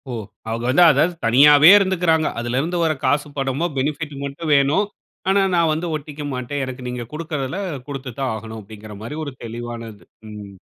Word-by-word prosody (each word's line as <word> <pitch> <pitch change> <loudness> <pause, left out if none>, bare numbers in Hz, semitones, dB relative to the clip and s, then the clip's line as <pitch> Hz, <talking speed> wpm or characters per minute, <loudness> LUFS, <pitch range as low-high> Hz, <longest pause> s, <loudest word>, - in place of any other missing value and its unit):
ஓ! - - -4 0.4
அவங்க 115 +1 -3
வந்து 160 +7 +5
அதாவது 150 +5 +2
தனியாவே 145 +6 +7
இருந்துகிறாங்க. 180 -5 +2
அதிலிருந்து 130 +9 -1
வர்ற 160 -1 +1
காசு 145 +3 +1
பணமோ, 135 +4 -1
பெனிபிட் 150 +2 -2
மட்டும் 145 +3 -4
வேணும். 145 +8 +3 0.4
ஆனா 195 +1 +4
நான் 165 -2 +3
வந்து 165 +3 -3
ஒட்டிக்க 150 0 -7
மாட்டேன். 130 +3 -3
எனக்கு 130 0 -8
நீங்க 125 -1 -4
குடுக்கிறதுல 155 0 -4 0.3
கொடுத்து 135 -2 -6
தான் 135 -3 -1
ஆகணும் 110 0 -8
அப்படின்கிற 105 +1 -11
மாதிரி 145 +7 -6
ஒரு 140 - -6
தெளிவானது. 115 -3 -7 0.3
ம். 105 -2 -9
140 Hz, 165 wpm, -21 LUFS, 120-155 Hz, 0.4 s, தனியாவே